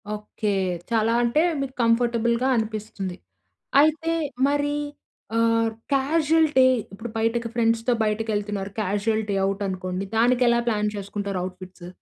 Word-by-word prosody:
Okay. 210 0 -3 0.4
చాలా 225 0 +2
అంటే 235 +6 +2 0.2
మీకు 265 -1 -4
కంఫర్టబుల్‌గా 235 +1 +2
అనిపిస్తుంది. 215 -4 -4 0.6
అయితే 320 +2 +2 0.4
మరి 290 0 0 0.6
ఆహ్, 230 0 +3 0.2
క్యాజువల్‌టి 300 0 +3 0.3
ఇప్పుడు 225 +4 -7
బయటకి 230 +1 0
ఫ్రెండ్స్‌తో 230 +1 +2
బయటకెళ్తున్నారు. 210 -2 -2
క్యాజువల్‌టి 210 +1 -1
అవుట్ 195 +1 -1
అనుకోండి. 185 0 -3
దానికెలా 240 0 +4
ప్లాన్ 210 -2 +1
చేసుకుంటారు, 200 -1 -4
అవుట్‌ఫిట్స్? 185 -1 -9
225 Hz, 105 wpm, -24 LUFS, 205-240 Hz, 0.6 s, దానికెలా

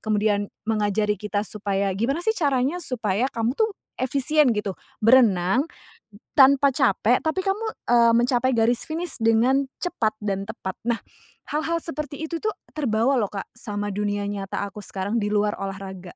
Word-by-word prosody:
kemudian 210 -1 +1 0.2
mengajari 210 -1 0
kita 205 0 -2
supaya 200 -2 -1
gimana 265 - -1
sih 440 - +3
caranya 285 - 0
supaya 235 - -1
kamu 230 -1 -1
tuh 440 +10 +1 0.3
efisien 280 +3 +2
gitu. 210 -2 -2 0.3
Berenang 230 - +4
b - - -22 0.5
tanpa 280 0 +6
capek 250 -3 +2
tapi 315 +4 0
kamu, 395 +3 0 0.3
eee, 235 -1 +6
mencapai 245 +2 +2
garis 230 0 +2
finish 330 +1 -4
dengan 235 +5 +4 0.2
cepat 225 -12 -1
dan 195 -2 -2
tepat. 200 -3 -6
Nah, 235 0 0 0.4
hal-hal 315 +3 -1
seperti 300 -2 -5
itu 330 +1 -3
tuh 430 +3 -2 0.2
terbawa 255 -2 +1
loh, 210 - +1
Kak, 195 0 -7
sama 205 -3 -4
dunia 205 0 -1
nyata 200 -1 -3
aku 200 +1 -7
sekarang 200 +2 -2
di 205 - -1
luar 210 0 0
olahraga. 190 -2 -7
225 Hz, 155 wpm, -24 LUFS, 205-275 Hz, 0.5 s, tanpa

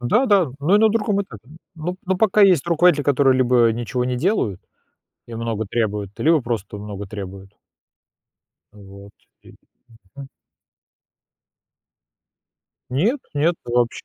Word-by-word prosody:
Да-да, 200 - +2
но 160 +8 +3
и - - +4
на 220 - +5
другом 210 -2 0
этапе. 120 - -14 0.3
Ну 175 +2 -5
ну, 190 0 0
пока 215 +1 +2
есть 180 -6 +4
руководители, 170 -2 +3
которые 135 -2 +3
либо 120 -2 +3
ничего 120 +2 -3
не 125 0 -2
делают 125 - -1 0.7
и 115 - -8
много 115 -1 -3
требуют, 105 -2 -2
либо 160 -1 +3
просто 115 -4 -4
много 105 -1 -7
требуют. 95 0 -9 1.2
Вот, 100 0 -14 0.3
и - - -17 0.6
мгм. 140 -1 -9 2.6
Нет, 210 - 0
нет, 160 +4 +2
вообще. 120 0 -1
125 Hz, 125 wpm, -21 LUFS, 110-180 Hz, 2.6 s, на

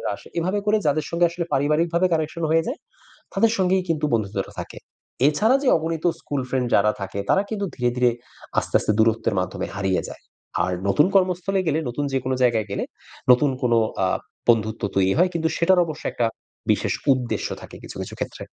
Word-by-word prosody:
আসে। - - -15
এভাবে 185 +5 0
করে 215 +1 +3
যাদের 150 +1 +1
সঙ্গে 170 +1 +2
আসলে 170 0 -4
পারিবারিকভাবে 165 +5 +2
connection 160 +1 -2
হয়ে 165 0 +4
যায়, 265 +8 -4 0.6
তাদের 230 - +4
সঙ্গেই 185 0 +2
কিন্তু 155 -2 0
বন্ধুত্বটা 100 -3 -2
থাকে। - - -8 0.5
এছাড়া 215 - +3
যে 275 - +1
অগণিত 160 0 -3 0.2
স্কুল 145 -2 -3
ফ্রেন্ড 125 -1 0
যারা 105 +1 +5
থাকে 100 0 -5
তারা 195 - +4
কিন্তু 205 -2 -2
ধীরে, 125 -1 +1
ধীরে 125 -1 +4 0.5
আস্তে, - - -2
আস্তে - - +1
দূরত্বের 115 0 +2
মাধ্যমে 90 0 -3
হারিয়ে 95 -2 0
যায়। - - -11 0.4
আর 90 - -2 0.2
নতুন 150 - +4
কর্মস্থলে 185 0 +2
গেলে 155 0 +1
নতুন 140 +4 -2
যেকোনো 130 0 0
জায়গায় 115 -4 +2
গেলে 100 - -2 0.5
নতুন 135 +3 +3
কোনো 120 -2 +3 0.3
আ - - +3 0.4
বন্ধুত্ব 110 -1 +2
তৈরি 95 0 +3
হয়। 180 +2 +5
কিন্তু 160 -1 +1
সেটার 180 +1 +4
অবশ্য 155 -2 -7
একটা 120 - +1 0.5
বিশেষ - - -1 0.2
উদ্দেশ্য 125 -2 -1
থাকে - - -11
কিছু, - - -10
কিছু - - -7
ক্ষেত্রে। - - -5
150 Hz, 180 wpm, -23 LUFS, 115-170 Hz, 0.6 s, যারা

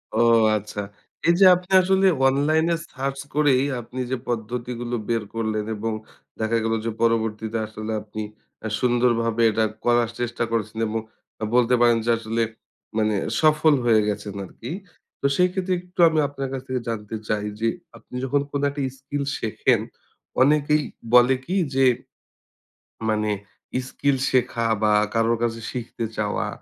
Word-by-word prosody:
ও - - +1 0.4
আচ্ছা! 105 0 -5 0.5
এই 170 - +6
যে 195 - +8
আপনি 180 +2 -8
আসলে 190 +1 +3 0.2
অনলাইন 150 +4 +2
এ - - +2 0.2
সার্চ 135 +1 -3 0.2
করেই 140 -3 +4 0.2
আপনি 125 +3 -8
যে 130 - 0
পদ্ধতিগুলো 120 +1 -3
বের 115 -2 +1
করলেন 110 -2 -1
এবং 110 +1 -2 0.5
দেখা 110 +1 +1
গেল 115 0 0
যে 115 - 0
পরবর্তীতে 110 -1 0
আসলে 110 0 -6
আপনি 110 0 -7 0.4
আ - - 0
সুন্দরভাবে 120 -2 +2
এটা 110 +1 +1 0.2
করার 120 -1 +3
চেষ্টা 120 0 -1
করছেন 110 -1 -2
এবং 110 +1 -1 0.6
বলতে 125 0 +4
পারেন 120 -1 +5
যে - - 0
আসলে 115 0 -2 0.6
মানে 110 -1 +2 0.3
সফল 155 0 +5
হয়ে 110 -2 +5
গেছেন 105 -1 -3
আরকি। 120 - -9 0.5
তো - - -3
সেই 180 0 +4
ক্ষেত্রে 185 0 -1
একটু 180 0 -20
আমি 160 -1 +1
আপনার 135 -2 -5
কাছ 130 - -3
থেকে 130 -2 -2
জানতে 110 -1 -4
চাই 105 -1 0
যে, 115 - +1 0.3
আপনি 125 - -13
যখন 140 +2 +1
কোন 140 - -1
একটা 140 0 -5 0.2
স্কিল 140 +1 -3 0.2
শেখেন 110 -3 +1 0.6
অনেকেই 150 +2 +4 0.3
বলে 125 +2 +7
কি 185 - -2 0.2
যে, 135 0 +4 1.2
মানে 105 -1 +1 0.6
স্কিল 140 -1 +1
শেখা 120 -2 +1 0.2
বা 105 - +4 0.2
কারোর 115 0 +2
কাছে 115 -1 -1
শিখতে 120 -1 -4
চাওয়া 105 -2 -1
120 Hz, 150 wpm, -23 LUFS, 110-140 Hz, 1.2 s, যে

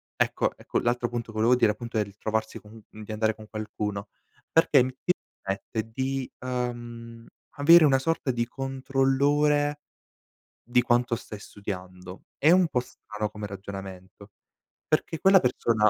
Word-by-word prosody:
ecco - - 0
ecco, - - -4
l'altro 120 0 0
appunto, 120 -1 -5
volevo 115 +3 +3
dire, 110 -4 +4
appunto, 115 +1 -5
è 105 - +3
ritrovarsi 110 +2 -3
co 105 - -16 0.2
di 110 0 -10
andare 110 0 +1
con 110 0 -13
qualcuno 105 -2 -4 0.4
perché 165 -3 +5 0.2
ti 180 - +2 0.3
permette 110 +3 -4
di, 130 +2 -2
ehm, 120 -2 -5 0.3
avere 165 +3 +7
una 135 -2 +5
sorta 165 0 -1
di 120 -1 -1
controllore 140 +3 +1 0.8
di 125 +1 +2
quanto 120 0 +2
stai 110 -2 -9
studiando. 95 -3 -8 0.2
È 155 - +5
un 180 -1 +5
po' 125 - +1
strano 105 -3 -6
come 105 0 -7
ragionamento 95 0 -9 0.6
perché 155 +1 0
quella 195 +2 +6
persona 115 -5 +2
120 Hz, 140 wpm, -27 LUFS, 105-135 Hz, 0.8 s, avere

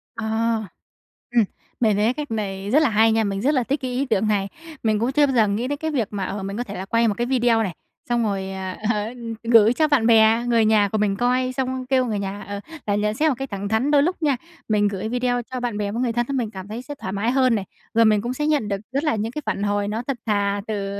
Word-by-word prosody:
Ờ, 225 - -4 1.1
ừm, 240 -2 +4 0.4
mề 220 -3 +3
thấy 215 +4 +2
cách 295 -2 -6
này 200 -2 -3
rất 300 +5 +5
là 290 - +3
hay 220 +1 +4
nha, 225 0 +2
mình 195 -1 -2
rất 280 +6 +2
là 260 -4 +2
thích 275 +5 -2
cái 255 -1 -3
ý 255 +3 0
tưởng 215 -5 +1
này. 200 -2 +1 0.4
Mình 215 -2 +2
cũng 235 +4 0
chưa 290 +1 +4
bao 270 - -1
giờ 220 -3 +4
nghĩ 210 +5 -1
đến 290 +2 -2
cái 315 +2 -3
việc 245 -8 0
mà, 200 -2 -3
ờ, 195 +1 -4
mình 195 +1 -4
có 245 - -1
thể 205 -4 -8
là 190 - -5
quay 230 +3 +2
một 210 - +2
cái 240 - -1
video 240 -3 +2
này, 185 -6 -4 0.3
xong 240 -1 +2
rồi, 195 -3 -2
à, 190 -1 -5
ờ, 215 +2 -2 0.3
gửi 230 -1 +6
cho 310 +4 +2
bạn 275 -7 +3
bè, 225 +1 +5
người 230 -2 +3
nhà 215 -2 +4
của 215 - -1
mình 205 -2 +1
coi 255 +2 +1
xong 260 -1 -2
kêu 260 -1 +2
người 215 -4 -2
nhà, 200 +1 -4
ờ, 200 0 -4 0.3
là 205 - +2
nhận 210 +1 0
xét 310 +6 +2
một 275 - 0
cách 270 0 -4
thẳng 200 0 -4
thắn. 225 +7 +1
Đôi 285 -1 +5
lúc 355 +2 -1
nha, 285 -4 +2 0.3
mình 210 -1 +3
gửi 200 +1 -3
video 245 0 0
cho 255 - -3
bạn 240 -4 -2
bè 205 -1 -2
với 230 +4 -2
người 240 -2 0
thân 240 +1 0
mình 230 -4 -2
cảm 190 -2 -8
thấy 220 +3 -6
sẽ 290 +3 -8
thoải 190 -8 -6
mái 210 +4 0
hơn 255 -2 +3
này, 200 -3 -2 0.3
rồi 230 0 +5
mình 215 -2 +4
cũng 240 +3 -3
sẽ 295 +3 -2
nhận 295 -8 +1
được 200 -1 -1 0.2
rất 280 +2 0
là 300 -5 +1
những 220 +2 -2
cái 300 - -5
phản 200 - -2
hồi 205 0 0
nó 220 +3 -3
thật 275 -3 -1
thà 205 -2 0
từ 200 -2 -3
225 Hz, 285 wpm, -22 LUFS, 205-255 Hz, 1.1 s, gửi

